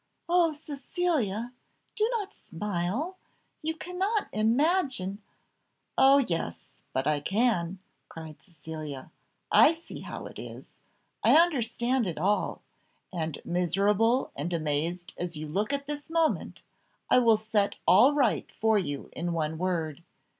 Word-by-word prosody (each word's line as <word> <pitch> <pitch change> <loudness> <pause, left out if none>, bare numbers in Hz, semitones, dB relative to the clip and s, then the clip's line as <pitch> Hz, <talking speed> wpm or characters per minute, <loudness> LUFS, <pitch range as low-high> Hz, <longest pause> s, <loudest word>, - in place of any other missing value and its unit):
"Oh, 345 -1 +4
Cecilia! 285 - -2 0.4
do 435 +1 +2
not 410 -2 -5
smile; 205 - -3 0.4
you 320 +1 -2
cannot 380 +6 -1
imagine 235 - +1 0.4
" - - -48 0.2
"Oh, 270 +1 +7
yes! 165 - -2 0.2
but 130 0 -1
I 150 -1 +2
can," 195 0 +1 0.3
cried 160 -2 -10
Cecilia. 155 -5 -8 0.4
"I 320 - +7
see 330 +1 -10
how - - -7
it - - -9
is; - - -9 0.5
I - - +7
understand 250 - +2
it 170 - -4
all; 200 +6 0 0.5
and 160 -3 -3
miserable 200 +8 +2
and 150 +5 -3
amazed 165 +2 -2
as 175 -2 -4
you 155 0 -5
look 200 - -1
at 280 0 -2
this 290 +1 -6
moment, 330 -1 0 0.5
I - - +7
will 230 -3 +5
set 215 -2 0
all 280 +4 +7
right 260 -7 +1
for 220 -1 +2
you 145 -7 -4
in 170 +1 -2
one 160 -1 -2
word. 170 -4 -1
210 Hz, 130 wpm, -28 LUFS, 170-285 Hz, 0.5 s, Oh